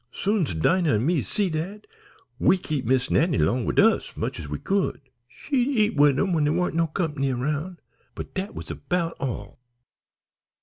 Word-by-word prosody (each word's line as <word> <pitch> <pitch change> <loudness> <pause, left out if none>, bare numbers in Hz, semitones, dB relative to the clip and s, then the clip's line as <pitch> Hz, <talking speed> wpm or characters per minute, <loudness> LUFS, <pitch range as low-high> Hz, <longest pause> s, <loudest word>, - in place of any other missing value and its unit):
Soon's 195 - 0
Dinah 165 - +2
an' 110 +4 0
me 165 -2 +2
see 200 - -1
dat, 185 +7 -4 0.5
we 190 - +4
kep' 150 -7 -3
Miss 130 +2 +1
Nannie 160 0 +3
long 125 -2 +1
wid - - +1
us - - +3
much - - -3
as 75 - -7
we 75 - -3
could. 195 - -1 0.3
She'd 250 - -1
eat 215 -9 +1
wid 145 -2 +5
'em 190 +2 +1
when 160 -3 +2
dere 150 +1 +2
warn't 180 +1 0
no 165 0 +1
company 150 -5 -1
'round, 150 +8 -3 0.3
but - - -7
dat 190 +2 -4
was - - -7
'bout 170 -2 -2
all." 115 -6 -5
160 Hz, 180 wpm, -25 LUFS, 135-190 Hz, 0.5 s, wid